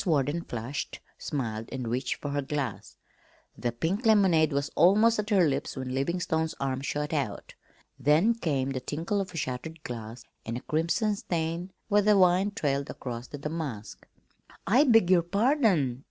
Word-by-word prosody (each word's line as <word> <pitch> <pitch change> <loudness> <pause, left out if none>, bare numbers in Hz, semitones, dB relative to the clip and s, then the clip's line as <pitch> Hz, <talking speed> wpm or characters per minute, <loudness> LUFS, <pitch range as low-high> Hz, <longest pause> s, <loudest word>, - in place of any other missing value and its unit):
Warden 155 -1 +1
flushed, 125 -1 -5 0.2
smiled, 115 -6 -4
and 130 -3 -4
reached 125 +2 -1
for 145 - -5
her 145 0 0
glass. 135 -5 -4 0.6
The 120 +1 -2
pink 165 - -2
lemonade 190 -8 +4
was 140 0 -1
almost 215 +5 +5
at 210 0 -2
her 190 -6 +4
lips 135 -2 -2
when 130 -1 -4
Livingstone's 160 +3 -1
arm 135 -1 -2
shot 150 +2 -3
out. 140 -4 -3 0.5
Then 160 +11 +4
came 140 - -1
the 130 - -2
tinkle 165 +10 -2
of 190 - -5
shattered 150 +4 -4
glass 115 -1 -7 0.2
and 115 +1 -4
a - - -7
crimson 170 +7 0
stain 170 0 -3 0.2
where 205 -1 +4
the 210 0 +4
wine 185 +2 +4
trailed 140 -9 -1
across 120 -1 -6
the 145 - -8
damask. 145 -7 -6 0.6
"I 250 - +5
beg 225 -8 +5
your 180 -2 +6
pardon!" 200 - +2
155 Hz, 160 wpm, -28 LUFS, 130-190 Hz, 0.6 s, your